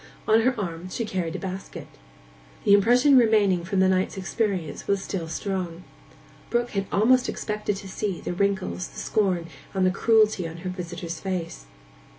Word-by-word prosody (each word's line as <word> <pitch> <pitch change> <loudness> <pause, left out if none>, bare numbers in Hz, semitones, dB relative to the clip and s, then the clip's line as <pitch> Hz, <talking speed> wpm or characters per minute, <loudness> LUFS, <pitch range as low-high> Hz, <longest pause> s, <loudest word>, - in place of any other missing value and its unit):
On 220 +1 +5
her 255 +2 +1
arm 175 -2 -4
she 230 +5 -3
carried 180 -5 -3
a - - -1
basket. 190 0 -6 0.8
The 200 - +5
impression 245 +7 +6
remaining 205 -6 +3
from 190 +2 0
the 190 - +5
night's 185 +1 +1
experience 190 -5 -2
was 200 -1 +1
still 175 -4 -4
strong. 180 -1 -4 0.7
Brook 240 0 0
had 195 -1 -2
almost 245 +5 +4
expected 210 -1 -2
to 195 0 -8
see 190 -1 -3
the - - -4
wrinkles, 190 -1 -1
the - - -15
scorn, 185 -5 0 0.3
and 190 -1 +2
the 185 - +4
cruelty 215 -3 +3
on 165 +1 -8
her - - -1
visitor's 175 -2 -6
face. 180 - -4
190 Hz, 165 wpm, -25 LUFS, 180-210 Hz, 0.8 s, impression